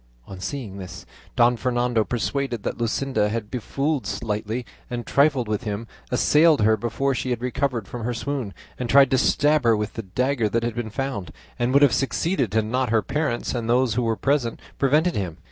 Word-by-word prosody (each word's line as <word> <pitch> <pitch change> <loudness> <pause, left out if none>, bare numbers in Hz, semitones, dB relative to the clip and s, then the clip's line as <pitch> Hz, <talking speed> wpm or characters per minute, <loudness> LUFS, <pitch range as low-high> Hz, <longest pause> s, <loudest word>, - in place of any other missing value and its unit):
On 95 - -9
seeing 105 -3 -5
this, 95 -2 -9 0.3
Don 120 +1 +4
Fernando, 120 -2 +1
persuaded 125 0 -2
that - - -3
Luscinda 115 -2 0
had 110 -1 -4
befooled, 135 +3 -2
slighted, 110 +2 -3 0.2
and 120 -1 -4
trifled 140 -4 +2
with 105 +1 -1
him, 105 +1 -3 0.2
assailed 150 +3 +4
her 110 +1 +4
before 120 +5 -1
she 130 - -3
had 120 -2 -1
recovered 125 -4 -1
from 120 -2 -6
her 120 +2 -1
swoon, 130 -4 -3 0.2
and 125 -2 -3
tried 135 -1 +6
to 130 - +4
stab 150 +2 +3
her 115 -2 +4
with 105 -1 -3
the 115 - -4
dagger 120 +3 0
that 115 +3 0
had 120 -1 -1
been 115 -1 -4
found, 110 - -4 0.3
and 120 +1 +1
would 140 +2 +5
have 140 - +5
succeeded 135 - 0
had 110 -1 +2
not 125 +3 0
her 110 -1 +2
parents 140 -3 -1
and 115 -2 -3
those 125 -1 +3
who 125 - 0
were 115 -1 +1
present 135 -4 0 0.2
prevented 150 +6 +3
him. 90 -5 -3
120 Hz, 195 wpm, -24 LUFS, 110-135 Hz, 0.3 s, tried